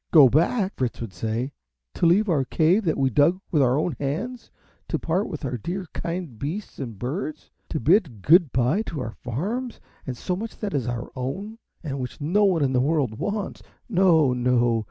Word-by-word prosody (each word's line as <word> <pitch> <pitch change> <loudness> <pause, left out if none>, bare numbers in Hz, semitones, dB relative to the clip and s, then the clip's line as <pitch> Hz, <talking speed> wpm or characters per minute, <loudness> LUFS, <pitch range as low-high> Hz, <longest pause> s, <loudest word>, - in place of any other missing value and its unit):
"Go 145 -6 +8
back!" 185 - +2
Fritz 125 -3 -2
would 115 -5 -6
say; 115 +8 -2 0.4
"to 170 - +2
leave 200 +6 +4
our 155 -7 +2
cave, 170 - +2
that 160 - +1
we 135 -1 +2
dug 150 - +4
with 155 -5 +3
our 130 0 +3
own 155 -1 0
hands; 195 - -3 0.4
to - - -1
part 180 +6 -1
with - - -5
our 125 -2 -2
dear 180 - -4
kind 170 -9 -4
beasts 170 +9 -5
and 115 -6 -5
birds; 150 - -4 0.2
to 155 - -2
bid 155 - +2
good 165 -2 +6
by 130 - +2
to 160 - -4
our 115 -3 -3
farms, 205 - -4 0.3
and 125 -2 -4
so 180 - -2
much 220 +4 -6
that 210 -2 -4
is 135 -5 -1
our 120 -1 -4
own, 195 - -5 0.2
and 140 -4 -4
which 125 -1 -5
no 185 +8 +2
one 175 -6 +3
in 135 -1 +1
the 125 - +3
world 135 -6 0
wants. 205 +3 -3 0.3
No, 170 - +4
no! 120 -2 +2
150 Hz, 195 wpm, -24 LUFS, 125-185 Hz, 0.4 s, Go